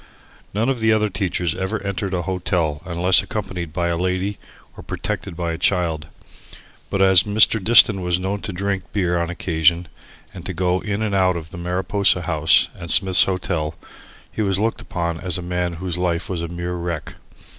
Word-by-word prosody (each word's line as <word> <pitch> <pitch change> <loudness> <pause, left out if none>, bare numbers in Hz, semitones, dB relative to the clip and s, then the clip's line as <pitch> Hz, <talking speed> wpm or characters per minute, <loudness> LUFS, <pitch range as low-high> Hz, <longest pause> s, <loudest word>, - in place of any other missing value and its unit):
None 110 +4 -1
of 135 -3 0
the 110 0 +2
other 105 -1 +2
teachers 90 -4 -1
ever 95 +4 -3
entered 100 -1 -3
a 90 - -2
hotel 85 -4 -1
unless 90 +1 +4
accompanied 90 -6 -5
by 85 +1 -1
a 85 - 0
lady 95 +3 -2 0.4
or - - -10
protected 95 -4 -5
by 85 -1 -2
a 80 - -6
child. 85 -5 0 0.8
But 95 -1 +1
as 95 -3 +6
Mr. 105 +1 +4
Diston 110 -2 +6
was 90 -1 0
known 95 +2 -3
to - - -4
drink 95 0 -3
beer 90 -4 0
on 85 - -2
occasions 85 -1 +1 0.5
and - - -9
to - - -5
go 90 0 +1
in 105 +2 -3
and 105 -2 -2
out 95 -2 +2
of 80 0 -9
the 90 - -9
Mariposa 90 +1 +1
House 80 -2 +3
and 85 -2 -9
Smith's 95 0 +5
Hotel, 90 -5 -2 0.6
he - - -4
was 95 -2 +2
looked 110 +3 -1
upon 85 -2 -3
as 90 -2 -1
a 90 - -6
man 90 0 -2
whose 90 +1 -3
life 90 -1 -1
was 90 -3 -3
a 85 - -3
mere 85 +1 -5
wreck. 85 -2 -4
90 Hz, 190 wpm, -21 LUFS, 85-100 Hz, 0.8 s, as